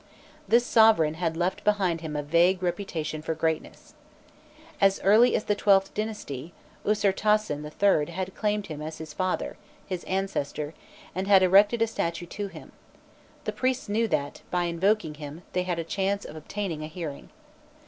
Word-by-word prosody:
This 240 Hz, +1 st, +4 dB
sovereign 220 Hz, -11 st, +5 dB
had 165 Hz, 0 st, -2 dB
left 180 Hz, +2 st, -1 dB
behind 190 Hz, -6 st, +1 dB
him 155 Hz, -2 st, -5 dB
a 145 Hz, -, -1 dB
vague 175 Hz, +5 st, +3 dB
reputation 170 Hz, -4 st, -3 dB
for 160 Hz, +1 st, -3 dB
greatness. 160 Hz, 0 st, -3 dB, 0.9 s
As 195 Hz, -1 st, +4 dB
early 220 Hz, +5 st, +5 dB
as -, -, 0 dB
the 205 Hz, -, +1 dB
XIIth 195 Hz, -1 st, +3 dB
dynasty 175 Hz, -9 st, -5 dB, 0.3 s
Usirtasen 210 Hz, -5 st, +1 dB
III. 155 Hz, 0 st, +1 dB
had 185 Hz, +2 st, -4 dB
claimed 210 Hz, -1 st, -1 dB
him 150 Hz, -2 st, -7 dB
as 155 Hz, +1 st, -6 dB
"his 155 Hz, -1 st, -8 dB
father" 185 Hz, -1 st, -2 dB, 0.3 s
his 185 Hz, -3 st, -4 dB
ancestor 160 Hz, -6 st, -2 dB, 0.4 s
and 190 Hz, +2 st, -3 dB
had 195 Hz, -2 st, +6 dB
erected 205 Hz, +5 st, +5 dB
a -, -, +4 dB
statue 170 Hz, -5 st, -3 dB
to 200 Hz, +4 st, -5 dB
him; -, -, -12 dB, 0.7 s
the -, -, -2 dB
priests 255 Hz, 0 st, -1 dB
knew 220 Hz, +3 st, +1 dB
that, 145 Hz, -6 st, -2 dB
by 180 Hz, -1 st, 0 dB
invoking 175 Hz, 0 st, +1 dB
him, 150 Hz, +3 st, -9 dB
they 180 Hz, -, +1 dB
had 180 Hz, -1 st, -2 dB
a 165 Hz, -, -2 dB
chance 195 Hz, +4 st, -1 dB
of -, -, -9 dB
obtaining 165 Hz, 0 st, -4 dB
a -, -, -4 dB
hearing. 155 Hz, -3 st, -7 dB
180 Hz, 165 wpm, -27 LUFS, 160-205 Hz, 0.9 s, had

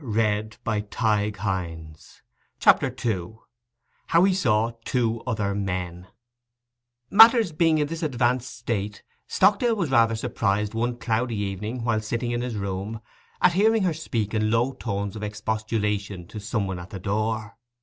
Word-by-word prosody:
CHAPTER 130 Hz, -, +4 dB
II—HOW 120 Hz, -, -3 dB
HE 195 Hz, 0 st, +4 dB
SAW 115 Hz, -, +2 dB
TWO 115 Hz, -2 st, 0 dB
OTHER 105 Hz, -4 st, -1 dB
MEN 90 Hz, -2 st, -3 dB, 1.0 s
Matters 225 Hz, -2 st, +7 dB
being 160 Hz, 0 st, +3 dB
in 150 Hz, -, +2 dB
this 160 Hz, +2 st, -5 dB
advancing 125 Hz, -4 st, 0 dB
state, 105 Hz, -5 st, -4 dB, 0.2 s
Stockdale 225 Hz, +3 st, +3 dB
was 175 Hz, -9 st, -2 dB
rather 115 Hz, -3 st, +4 dB
surprised 105 Hz, -3 st, -1 dB
one 120 Hz, +2 st, -1 dB
cloudy 115 Hz, 0 st, -1 dB
evening, 105 Hz, +4 st, -3 dB
while 115 Hz, -2 st, +1 dB
sitting 115 Hz, +3 st, -2 dB
in 120 Hz, 0 st, -1 dB
his 125 Hz, -2 st, -3 dB
room, 100 Hz, +2 st, -4 dB, 0.4 s
at 175 Hz, -, +6 dB
hearing 215 Hz, +3 st, +3 dB
her 180 Hz, -3 st, +1 dB
speak 115 Hz, -9 st, -3 dB
in 110 Hz, -1 st, +1 dB
low 120 Hz, +4 st, +1 dB
tones 100 Hz, -5 st, -4 dB
of 110 Hz, -, -6 dB
expostulation 105 Hz, -2 st, -2 dB
to 110 Hz, -, -7 dB
some 105 Hz, 0 st, -2 dB
one 95 Hz, -2 st, -4 dB
at 85 Hz, +2 st, -9 dB
the 95 Hz, -, -7 dB
door. 110 Hz, +2 st, -2 dB
115 Hz, 135 wpm, -25 LUFS, 105-125 Hz, 1.0 s, Matters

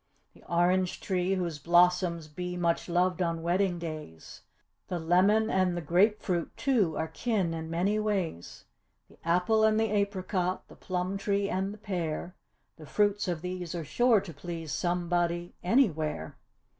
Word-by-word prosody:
The -, -, -20 dB
orange 180 Hz, +1 st, +2 dB
tree, 185 Hz, 0 st, 0 dB
whose 170 Hz, -5 st, -3 dB
blossoms 175 Hz, 0 st, +3 dB
be 180 Hz, +4 st, -5 dB
much 170 Hz, 0 st, 0 dB
loved 180 Hz, +1 st, +1 dB
on 165 Hz, -2 st, -1 dB
wedding 180 Hz, +1 st, +1 dB
days; 155 Hz, -, -8 dB, 0.5 s
The 180 Hz, -, -2 dB
lemon 185 Hz, +7 st, +3 dB
and 185 Hz, -2 st, +1 dB
the -, -, -2 dB
grape 195 Hz, +7 st, +2 dB
fruit, 175 Hz, -3 st, -1 dB
too, 220 Hz, -, +1 dB
are 160 Hz, -, -1 dB
kin 185 Hz, 0 st, -1 dB
in 160 Hz, 0 st, -5 dB
many 190 Hz, +6 st, +1 dB
ways. 190 Hz, -, -3 dB, 0.5 s
The -, -, -21 dB
apple 180 Hz, +6 st, +2 dB
and 220 Hz, 0 st, +4 dB
the 220 Hz, -1 st, +1 dB
apricot, 190 Hz, -3 st, -1 dB
the -, -, -13 dB
plum 185 Hz, +1 st, -3 dB
tree 200 Hz, 0 st, 0 dB
and 190 Hz, +2 st, -1 dB
the 210 Hz, -, -9 dB
pear; 175 Hz, -4 st, -3 dB, 0.4 s
The 155 Hz, -2 st, -12 dB
fruits 205 Hz, +2 st, +1 dB
of 170 Hz, -2 st, -2 dB
these 180 Hz, -2 st, -4 dB
are 165 Hz, -2 st, -4 dB
sure 240 Hz, -, +3 dB
to 185 Hz, -4 st, -9 dB
please 165 Hz, +1 st, -6 dB
somebody, 175 Hz, -1 st, -1 dB
anywhere. 160 Hz, -, +1 dB
180 Hz, 155 wpm, -29 LUFS, 170-195 Hz, 0.5 s, and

